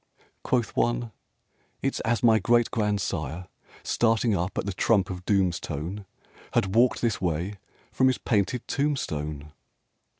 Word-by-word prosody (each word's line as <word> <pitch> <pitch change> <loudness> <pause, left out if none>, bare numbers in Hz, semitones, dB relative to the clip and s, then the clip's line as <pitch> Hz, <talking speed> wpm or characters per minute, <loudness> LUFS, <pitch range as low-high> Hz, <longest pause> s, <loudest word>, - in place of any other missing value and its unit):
Quoth 120 -3 0
one: 120 -1 0 0.7
"It's 135 - 0
as 115 +1 0
my 110 -2 +6
great 120 +3 +3
grandsire, 90 - -1 0.4
Starting 115 -1 +2
up 90 0 -2
at - - -1
the 100 - -2
Trump 100 0 +2
of 90 0 -7
Doom's 95 -5 +2
tone, 85 +7 -5 0.5
Had 95 0 +1
walked 120 +3 +3
this 115 -6 0
way 90 +3 -2 0.3
from 130 - +3
his 130 - +2
painted 110 +2 0
tombstone!" 75 - -2
105 Hz, 135 wpm, -26 LUFS, 90-120 Hz, 0.7 s, my